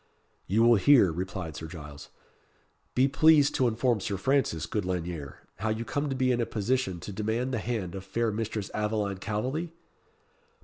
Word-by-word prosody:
"You 110 +4 +3
will 120 -1 +6
hear," 120 -5 +6
replied 90 -1 -5
Sir 80 - -6
Giles. 75 -3 -10 0.9
"Be 130 +2 +4
pleased 145 +1 +5
to 130 -3 +2
inform 120 0 +1
Sir 100 +1 -3
Francis, 115 - +1
good 105 +4 -2
Lanyere, 85 -6 -5
how 110 - -2
you 110 +2 -2
come 145 +3 -2
to 135 - -2
be 130 -1 +2
in 120 -1 +1
a - - +1
position 110 -4 -1
to - - -7
demand 110 +6 -2
the 115 - 0
hand 105 -6 -3
of 95 - -6
fair 115 +3 -1
Mistress 105 -1 -3
Aveline 105 -2 -1
Calveley?" 130 - -3
110 Hz, 175 wpm, -28 LUFS, 95-125 Hz, 0.9 s, will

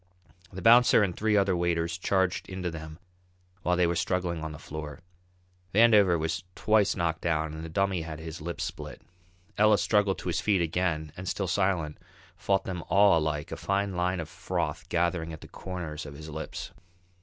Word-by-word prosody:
The 95 -1 -8
bouncer 120 -1 +7
and 90 -4 -1
three 110 -1 +2
other 100 -2 +3
waiters 85 -1 0
charged 95 +1 0
into 95 -2 -3
them 80 -1 -8 0.6
while 90 0 +1
they 90 - +4
were 85 0 0
struggling 85 -1 -1
on 80 - -4
the 75 - -8
floor. 75 0 -7 0.8
Vandover 105 -6 +6
was 80 +2 -2
twice 105 -2 +3
knocked 85 -3 -1
down 80 -2 0
and 80 0 -7
the 80 - -6
Dummy 95 +1 0
had 80 -1 -6
his 80 0 -8
lip 85 +1 -5
split. - - -6 0.6
Ellis 105 -1 +5
struggled 105 -3 +2
to - - -4
his 85 - 0
feet 100 -3 +2
again 80 -2 -1
and, 95 +1 -5
still 100 - -1
silent, 90 -4 0 0.4
fought 100 -1 0
them 90 -3 -5
all 100 -2 +5
alike, 75 -1 -2
a - - -4
fine 100 0 -1
line 90 +1 0
of 80 - -4
froth - - -3
gathering 85 -1 0
at 80 - -9
the - - -11
corners 85 -5 -6
of 70 - -9
his 80 +2 -9
lips. 80 +1 -6
85 Hz, 185 wpm, -28 LUFS, 80-95 Hz, 0.8 s, bouncer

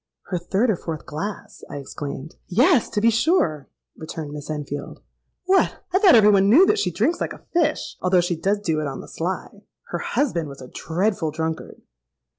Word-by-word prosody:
'—'Her 180 - 0
third 200 +7 +1
or - - +1
fourth 165 -2 -6
glass!' 165 +8 -6
I - - -6
exclaimed.—'Yes, 155 - 0
to 210 - -1
be 230 +1 +5
sure,' 230 - +1 0.3
returned 155 -1 -7
Miss 145 0 -8
Enfield. 145 -2 -5 0.5
'What! 380 +1 +3 0.2
I 380 - +4
thought 390 - +7
every 210 -2 +7
one 195 0 +4
knew 310 - +7
that 420 - +2
she - - +1
drinks 345 +1 0
like - - -2
a - - -15
fish; 335 -2 0
although 185 0 +3
she 175 0 -1
does 200 +5 0
do 160 -6 0
it 150 - -2
on 135 - -5
the - - -12
sly. 180 +3 -5 0.3
Her - - -3
husband 170 - -1
was 140 - -10
a 130 - -10
dreadful 180 0 -1
drunkard.' 160 +1 -5
180 Hz, 190 wpm, -23 LUFS, 155-225 Hz, 0.5 s, thought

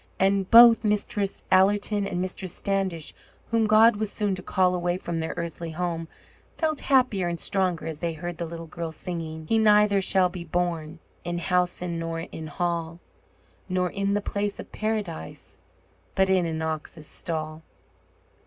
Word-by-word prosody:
And 195 0 +2
both 235 0 +9
Mistress 205 -1 -1
Allerton 200 +2 +3
and 175 - -3
Mistress 185 0 -4
Standish, 190 -5 -2 0.4
whom 225 -1 +3
God 215 +1 +6
was 215 -1 -2
soon 205 -2 -1
to 185 - -4
call 185 0 +2
away 175 0 0
from 170 -2 -4
their 160 - -3
earthly 170 0 -4
home, 165 0 -3 0.5
felt 310 -2 0
happier 250 -9 +2
and 170 -1 -3
stronger 185 -5 0
as 160 -2 -5
they 170 0 -2
heard 175 +1 -6
the 170 - -3
little 165 0 -7
girl 165 0 -5
singing: 160 -1 -6
He 225 - +3
neither 210 -2 +5
shall 190 -1 +3
be 180 -1 -7
born 170 -1 -2 0.3
In 175 0 -3
housen 180 -1 0
nor 165 0 -3
in 160 -1 -7
hall, 170 +1 -2 0.7
Nor 180 -1 0
in 200 0 0
the 205 - 0
place 205 0 -3
of - - -9
Paradise, 210 - -4 0.6
But 190 0 +3
in 185 -3 +3
an 160 0 -3
ox's 155 0 -5
stall. 155 -1 -4
180 Hz, 160 wpm, -26 LUFS, 165-200 Hz, 0.7 s, both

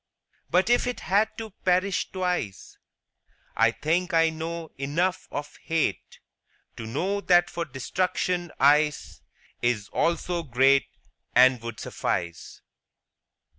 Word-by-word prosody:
But 185 +6 +3
if 245 - +3
it 250 - -3
had 205 +3 +2
to 220 -1 -6
perish 185 +1 +1
twice, 180 - -3 0.8
I 115 0 +4
think 165 +8 -1
I 165 0 +4
know 165 0 -5
enough 170 +7 -1
of 145 0 -6
hate 155 - -2 0.6
To 110 - -6
know 185 - -1
that 175 -2 +4
for 170 0 -3
destruction 175 +5 -2
ice 150 +1 +2 0.4
Is 120 -4 0
also 170 +1 0
great, 135 -1 +3 0.5
And 125 -1 +6
would 115 -2 -7
suffice. 85 -1 -4
165 Hz, 115 wpm, -26 LUFS, 130-180 Hz, 0.8 s, And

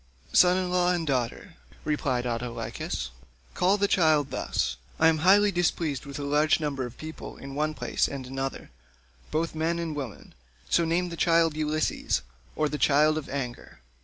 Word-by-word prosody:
"Son 180 0 +6
in 185 -1 -1
law 180 0 +3
and 175 -2 -1
daughter," 130 -5 -2 0.3
replied 135 -5 0
Autolycus, 115 - -4 0.4
"call 190 +3 +3
the 200 0 +2
child 155 -7 +3
thus: - - -1 0.2
I 160 - +6
am 160 -1 +1
highly 200 +5 +5
displeased 165 -6 -1
with 140 - -6
a 145 - -4
large 150 +2 +3
number 140 -4 -2
of 120 - -13
people 155 +1 -8
in 135 0 -9
one 155 +2 -1
place 125 -3 0
and 135 -2 -6
another, 135 - -5 0.6
both 160 +2 -1
men 160 +2 0
and 165 -2 -3
women; 135 -7 -7 0.3
so 170 - +3
name 175 +2 0
the 170 - -7
child 165 -2 +3
'Ulysses,' 155 - 0 0.3
or 155 - +1
the 150 0 -4
child 150 +2 +4
of 155 -2 -4
anger. 125 -4 -5
155 Hz, 170 wpm, -27 LUFS, 135-170 Hz, 0.6 s, Son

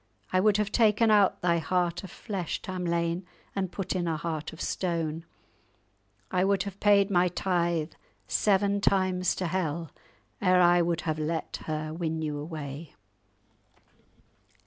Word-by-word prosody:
I 185 - +4
would 210 +1 +4
have 210 0 -1
taken 220 0 +4
out 205 -2 +4
thy 170 -1 +3
heart 175 +2 0
of 190 - -8
flesh, 190 -6 -4
Tamlane, 170 -1 -1 0.3
and 190 -2 -1
put 195 0 -3
in 175 -2 -1
a 160 -1 0
heart 155 -1 -4
of 160 - -12
stone. 165 -4 -2 1.1
I 185 0 +2
would 195 -1 +2
have 200 -1 -7
paid 200 -1 +4
my 180 -1 +4
tithe 170 -3 0 0.4
seven 200 - +2
times 185 -2 +2
to 185 - -3
hell 170 -2 -2 0.5
ere 185 -2 +4
I 175 0 +5
would 170 -1 0
have 155 -1 -2
let 160 +1 -2
her 155 0 -3
win 160 -1 -2
you 150 -1 -2
away." 150 -1 -7
175 Hz, 145 wpm, -28 LUFS, 160-190 Hz, 1.1 s, I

